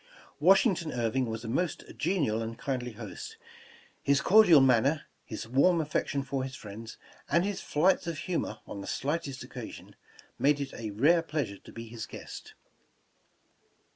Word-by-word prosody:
Washington 185 -1 +4
Irving 120 +1 0
was 110 +1 -5
a - - -5
most 160 +9 -1
genial 150 - 0
and 115 0 -5
kindly 125 -2 -3
host. 120 - -8 0.6
His 140 0 +3
cordial 190 -5 +7
manner, 135 +3 +4 0.2
his 110 -2 -6
warm 140 +8 +4
affection 145 -2 -1
for 135 -1 -2
his 130 0 -5
friends, 110 +2 -9 0.3
and 170 +4 +3
his 205 -1 -3
flights 175 +4 +2
of 165 -2 -3
humor 175 +3 -3
on 100 - -7
the - - -8
slightest 145 -2 -3
occa - - -7
sion, - - -13 0.4
made 145 +1 +3
it 140 -1 -4
a 115 -2 -5
rare 150 +12 +4
pleasure 145 - -3
to - - -14
be 115 0 -8
his 115 0 -7
guest. - - -9
140 Hz, 160 wpm, -29 LUFS, 115-165 Hz, 0.6 s, cordial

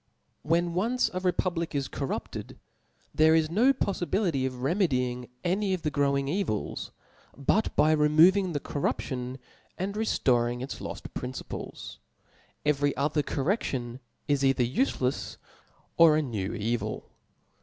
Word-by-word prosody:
When 170 +2 +1
once 230 +8 +1
a 185 - -1
republic 175 -3 -1
is 140 -1 0
corrupted, 135 -2 -5 0.6
there 160 +1 +5
is 160 -1 +2
no 235 +9 +5
jpoffibility 180 - 0
of 125 -1 -7
remedying 125 - 0
any 190 +2 +1
of 175 - -9
the 150 - 0
growing 140 -1 +1
evils, 145 - -2 0.5
but 165 +11 +1
by 155 - +4
removing 165 +5 +5
the 145 - 0
corruption 130 -3 -3 0.4
and 195 +2 -2
reftoring 120 - +1
its 135 - -6
loft - - -7
{>rinciples; 125 +1 -6 0.7
every 145 -2 +1
other 150 +2 +1
correftion 135 - -2 0.3
is 145 -2 +1
either 135 -2 +3
ufclcfs 130 - -1 0.6
or 160 -2 +7
a 155 - +1
new 105 -7 -3
evil. 115 +3 -3
150 Hz, 125 wpm, -28 LUFS, 130-180 Hz, 0.7 s, or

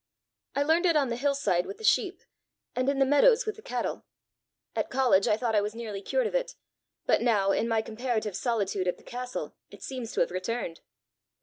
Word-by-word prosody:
I 285 - +2
learned 325 +5 +3
it 335 - +3
on 280 -4 +3
the 235 - -1
hill 280 +3 +1
side 185 -10 +1
with 400 - -7
the 445 - -12
sheep, - - +2 0.5
and 255 +2 +1
in 280 - 0
the 270 - +4
meadows 450 - +5
with 430 - -2
the 435 - -13
cattle. - - -3 0.7
At - - -1
college 245 -7 +3
I 210 - +3
thought 230 -1 -1
I 210 - +4
was 210 +2 -3
nearly 215 -4 -5
cured - - 0
of 445 - -2
it; - - -1 0.5
but - - +3
now, 210 -5 +3
in 230 - +1
my 225 -1 +1
comparative 220 -3 -2
solitude 200 -6 -1
at 180 - 0
the - - -19
castle, 250 +1 -5 0.2
it - - -13
seems 255 -4 -5
to - - +1
have - - +1
returned." 185 -1 -3
245 Hz, 215 wpm, -28 LUFS, 210-285 Hz, 0.7 s, meadows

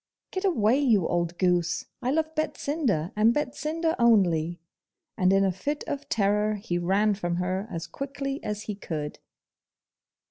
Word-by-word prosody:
'Get 375 +1 -2
away, 250 - +3
you 225 - +3
old 175 0 -1
goose! 175 -2 +1 0.2
I 250 - -1
love 315 +3 0
Betsinda, 280 - -1
and 220 +3 +4
Betsinda 305 +3 -1
only!' 175 -8 +3 0.6
And 185 -3 +3
in 195 0 +4
a 190 - +2
fit 285 +12 -3
of 285 0 -5
terror 210 0 +2
he 185 -4 -2
ran 200 +4 +2
from 175 -3 -2
her 185 +3 -2
as 165 -4 -4
quickly 275 - -5
as 210 0 -3
he 210 - -4
could. 155 -7 -5
210 Hz, 150 wpm, -27 LUFS, 180-275 Hz, 0.6 s, and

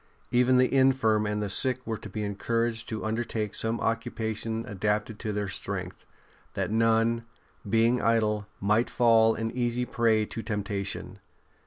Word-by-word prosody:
Even 125 +1 +4
the 125 +1 +3
infirm 130 -6 +3
and 105 0 -1
the - - -2
sick 130 +4 +3
were 110 -1 -3
to 105 - -9
be 105 +2 -4
encouraged 115 +3 -1
to 110 -1 -4
under 110 +2 -1
take 110 -3 -3
some 115 +1 -1
occupation 115 0 -2
adapted 105 0 -2
to 110 - -3
their 105 0 -2
strength^ 95 - -5 0.5
that - - -2
none, 115 +1 +2 0.4
being 115 +3 +3
idle, 105 -2 +1
might 105 +4 +2
fall 115 -2 +4
an 115 0 -3
easy 125 0 -1
prey 110 -3 +2
to 115 - -6
temptation. 100 -3 -4
115 Hz, 155 wpm, -27 LUFS, 105-115 Hz, 0.5 s, Even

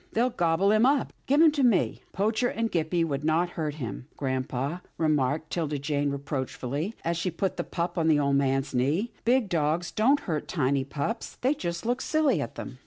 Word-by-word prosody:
" - - -39
They'll 245 +3 +2
gobble 175 +1 +2
him 215 +1 +4
up. 275 +1 +2
Give 285 +4 +5
him 320 - +7
to 290 -1 -1
me." 240 -6 +2
' - - -35
*' - - -35
Poacher 220 +5 +1
and 230 -1 -2
Gippie 165 0 +1
would 140 -2 -3
not 165 +3 +1
hurt 155 -4 -3
him, 125 -3 -6
grampa," 130 +4 -2 0.2
remarked 155 -1 +1
'Tilda 155 -4 -1
Jane 145 0 -1
reproachfully, 140 - -3
as 170 0 0
she 185 - -1
put 185 +3 -2
the 175 - -2
pup 170 +1 -3
on 160 - +1
the 155 -2 +4
old 140 -1 +2
man's 135 0 0
knee. 150 - +1
" - - -33
Big 245 -1 +3
dogs 165 0 0
don't 270 +7 +3
hurt 160 - -3
tiny 140 -4 +1
pups. 145 - -4
They 260 +3 +3
just 170 - -4
look 245 +2 0
silly 310 -2 +2
at - - -5
them." - - -8
165 Hz, 215 wpm, -27 LUFS, 145-215 Hz, 0.2 s, him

